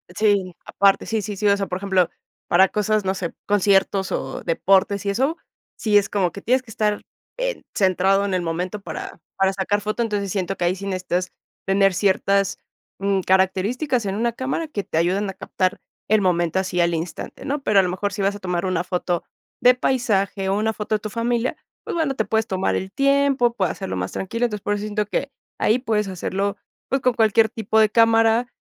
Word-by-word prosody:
Sí, 200 -4 +1
aparte, 195 0 +2
sí, 220 -1 -1
sí, 205 +1 -5
sí, 210 +2 0
o 200 - +4
sea, 195 - -1
por 180 - -3
ejemplo, 190 -3 +2 0.4
para 190 +2 +5
cosas, 210 0 0
no 190 - 0
sé, 180 -3 -4
conciertos 195 -1 +2
o - - -4
deportes 195 +4 +2
y - - +1
eso, 265 +10 +1 0.4
sí 210 -2 +2
es 205 0 +3
como 190 -5 0
que 200 - -9
tienes 255 +4 +2
que 230 -3 -14
estar, 210 -1 0 0.4
eh, - - -2
centrado 195 +1 +3
en 195 - -2
el 185 - +1
momento 175 +4 -3
para - - -7 0.2
para 195 0 +2
sacar 205 +2 0
foto. 215 +3 -2
Entonces, 205 -4 -1
siento 195 -1 -2
que - - -4
ahí 180 - +1
sí 195 +1 -8
necesitas 185 -1 -2 0.4
tener 195 0 +3
ciertas, 195 0 +1 0.4
mm, 195 0 +1
características 205 - +1
en 195 0 -2
una 235 +2 0
cámara 265 +7 -3
que 205 -9 -3
te 160 - -4
ayuden 190 +5 +1
a 195 - -5
captar 185 0 -2 0.3
el 215 -1 +3
momento 175 -2 +1
así 185 -1 -2
al 170 0 +3
instante, 165 +1 -5
¿no? 285 +1 -2
Pero 210 -6 +3
a 190 - +5
lo 180 - -1
mejor 200 +2 -2
si 200 - -3
vas 195 +1 +2
a 205 - -8
tomar 180 -1 -2
una 185 -2 0
foto 175 -1 -1 0.4
de 250 0 +6
paisaje 205 -7 0
o 195 - +1
una 220 +1 +1
foto 215 0 -2
de 210 - -1
tu 215 - -6
familia, 235 +2 -1 0.3
pues - - -5
bueno, 310 -5 0
te 220 - 0
puedes 220 0 0
tomar 190 0 0
el 190 0 -3
tiempo, 275 -3 +3
puedes 190 -7 0
hacerlo 95 - -5
más 90 +1 -3
tranquilo. 230 +5 -2
Entonces, 210 -4 -4
por 205 - 0
eso 205 0 -3
siento 210 0 -1
que 275 +6 -3 0.3
ahí 225 +4 +3
puedes 215 -5 0
hacerlo, 195 +2 -2 0.3
pues, 270 0 0
con 255 -1 +2
cualquier 220 -1 +3
tipo 220 -2 -2
de 215 -1 +5
cámara 225 +1 +4
200 Hz, 210 wpm, -22 LUFS, 190-225 Hz, 0.4 s, de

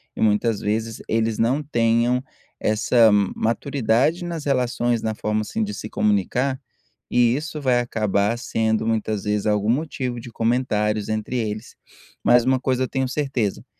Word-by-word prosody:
e - - -6
muitas 110 0 +2
vezes 110 +2 -2
eles 115 -1 0
não 130 +6 +1
tenham 120 -1 +1 0.4
essa 110 +1 +4
ma 100 -2 +2
maturidade 135 +6 +1
nas 170 -4 -5
relações, 120 -3 0
na 110 -1 -2
forma, 105 0 -1
assim, 220 - -2
de 210 0 -3
se 110 - -7
comunicar, 125 +7 0 0.5
e 120 0 +3
isso 150 +1 -4
vai 125 -3 +2
acabar 110 -2 0
sendo 110 -2 0
muitas 110 -2 -1
vezes 105 0 -1
algum 105 +1 +2
motivo 130 -4 -2
de 120 - -9
comentários 110 -3 0
entre 110 +3 -2
eles. 110 0 -4 0.5
Mas 120 -1 +5
uma 130 0 +2
coisa 130 -1 0
eu - - -1
tenho 130 -1 -1
certeza, 135 -8 -2
115 Hz, 155 wpm, -22 LUFS, 110-130 Hz, 0.5 s, Mas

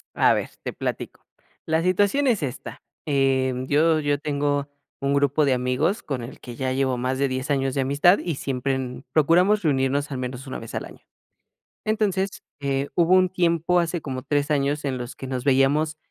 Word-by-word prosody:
A - - +5
ver, - - -2
te - - -4
platico. - - -5 0.4
La 160 +1 +1
situación 205 +10 +2
es 215 -10 +2
esta, 135 -1 -6 0.2
eh, 135 -2 +2
yo 155 +2 +3
yo 145 -1 0
tengo 145 -1 -1 0.3
un 140 0 0
grupo 140 +1 +2
de 135 -2 +3
amigos 125 - 0
con 135 -5 -3
el 120 - -9
que 120 -1 -9
ya 130 0 -2
llevo 130 -1 0
más 130 +2 -1
de 140 0 +1
10 130 +2 -3
años 135 -2 0
de 135 - 0
amistad 145 +8 +4
y 170 -4 -3
siempre, 135 0 -2
mm, 125 0 -6
procuramos 180 +7 +3
reunirnos 140 -1 +1
al 130 - -3
menos 125 +1 -5
1 130 - -6
vez 115 - -9
al - - -3
año. - - -13 0.9
Entonces, 200 -3 -1 0.2
eh, 140 0 -1
hubo 175 +1 +4
un 185 0 +5
tiempo 175 -1 +2
hace 170 0 -2
como 130 -3 -5
3 145 +2 0
años 145 0 0
en 135 -2 -1
los 125 0 -6
que 135 - -7
nos 130 -1 -4
veíamos 145 +3 +2
140 Hz, 195 wpm, -24 LUFS, 130-165 Hz, 0.9 s, A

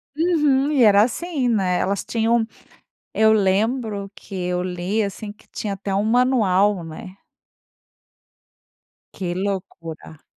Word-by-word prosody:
Uhum. 300 -4 +2
E 275 -4 +4
era 205 -2 +6
assim, 270 +1 -1
né, 190 -5 +1
elas 200 0 -1
tinham 230 0 +1 0.7
eu 220 0 +5
lembro 205 0 0
que 195 - -12
eu 180 -1 -2
li, 180 +4 -2
assim, 205 +1 -5
que 210 - -24
tinha 210 - -4
até 195 0 -4
um 200 +2 +1
manual, 210 -6 +2
né. 185 +4 -9 2.0
Que 175 -3 -4
loucura. 165 -5 -5
205 Hz, 120 wpm, -22 LUFS, 185-235 Hz, 2.0 s, era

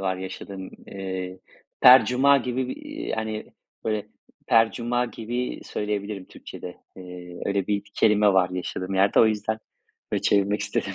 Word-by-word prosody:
var 95 -1 -1
yaşadığım, 95 0 -7 0.2
eee, 95 -1 -5 0.4
"percuma" 130 +2 +7
gibi 125 0 -2
bir, - - -4
eee, 300 +1 -6
hani, 110 -1 -4 0.3
böyle, 110 -2 -1 0.4
"percuma" 120 +2 +2
gibi 120 +2 -4
söyleyebilirim 105 -2 -3
Türkçede. 90 - -10 0.2
Eee, 90 -1 -9
öyle 100 -1 0
bir 100 -1 0
kelime 105 -2 +4
var 90 -1 +3
yaşadığım 90 +1 -4
yerde, 95 +1 +4
o 115 - +7
yüzden 110 0 -1 0.5
böyle - - 0
çevirmek 100 +1 +2
istedim. 100 -1 -2
105 Hz, 135 wpm, -25 LUFS, 95-115 Hz, 0.5 s, percuma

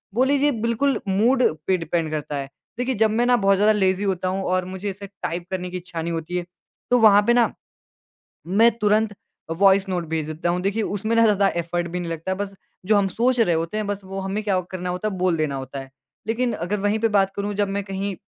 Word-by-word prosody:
बोल 255 +2 +3
लीजिए 285 +1 +3
बिल्कुल 260 +4 +1
मूड 235 +7 +3 0.2
पे 190 - +3
डिपेंड 165 -1 -2
करता 150 -1 -3
है। 135 -1 -5 0.3
देखिए 250 +1 -1
जब 220 - +5
मैं 235 +3 +2
ना 245 0 +4
बहुत 195 0 +5
ज़्यादा 210 +2 +4
लेज़ी 190 -1 +1
होता 185 -2 -1
हूँ 190 +1 -1
और 185 -1 +1
मुझे 190 +2 -5
ऐसे 200 +1 -7 0.2
टाइप 170 +1 -3
करने 180 -1 -3
की 180 - -4
इच्छा 175 -2 -6
नहीं 170 - -3
होती 165 +2 -3
है 175 - -3 0.5
तो 245 - +5
वहाँ 210 -2 +7
पे 240 - +5
ना, 240 -1 +3 0.9
मैं 220 +6 +5
तुरंत 210 0 +2 0.4
वॉइस 195 +2 +4
नोट 180 -2 -1
भेज 160 -2 -2
देता 155 +2 -2
हूँ। 175 +1 0
देखिए 200 +4 0
उसमें 215 +3 -1
ना 230 - +5
ज़्यादा 205 -2 +4
एफ़र्ट 170 +1 -2
भी 180 +1 -4
नहीं 170 -1 -4
लगता 165 +3 -4
है 190 - -2
बस 200 -1 -4 0.3
जो 215 +2 +3
हम 200 -1 +2
सोच 245 +6 +1
रहे 180 -7 +3
होते 165 +5 -2
हैं 215 -1 -2
बस 205 0 -3
वो 195 +1 -5
हमें 195 +2 -3
क्या 195 -3 +1
वो 185 - -1
करना 180 -1 -4
होता 180 +4 -2
है, - - -6
बोल 180 -2 +1
देना 155 -3 -1
होता 135 +1 -6
है। 135 - -9 0.4
लेकिन 235 +1 0
अगर 200 +1 -2
वहीं 205 +2 +1
पे 225 - +3
बात 195 0 +2
करूँ 205 +1 -2
जब 205 0 0
मैं - - -4
कहीं 195 0 -4
195 Hz, 245 wpm, -23 LUFS, 180-215 Hz, 0.9 s, वहाँ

